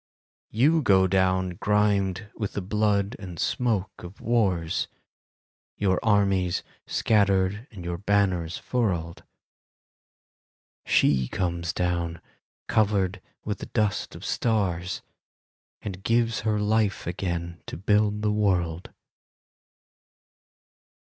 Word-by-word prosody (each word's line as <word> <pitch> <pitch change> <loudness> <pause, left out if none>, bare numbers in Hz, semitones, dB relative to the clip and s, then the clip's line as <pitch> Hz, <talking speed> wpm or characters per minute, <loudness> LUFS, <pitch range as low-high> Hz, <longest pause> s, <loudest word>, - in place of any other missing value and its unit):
You 150 +9 +3
go 95 -6 +5
down 95 0 +2
grimed 105 -1 +1
with 105 -3 -3
the 105 - -2
blood 105 +2 +1
and 90 -3 -8
smoke 110 -1 0
of 90 +2 -10
wars; 95 -9 +1 0.9
Your 95 -3 +2
armies 100 -5 +2 0.2
scattered 100 +1 +2
and 95 -5 -10
your 85 0 -3
banners 95 -4 +1
furled; 90 -9 -2 1.6
She 65 -3 +3
comes 85 -1 -2
down 85 -2 -1 0.5
covered 100 -3 +1 0.2
with 105 -1 -3
the - - -7
dust 105 -4 -1
of - - -9
stars, 95 -6 -1 0.8
And 95 -2 -5
gives 115 +1 +1
her 105 0 0
life 105 -1 +1
again 85 -1 -3
to - - -6
build 105 +2 +1
the 105 - +2
world. 90 -5 0
100 Hz, 105 wpm, -26 LUFS, 90-105 Hz, 1.6 s, go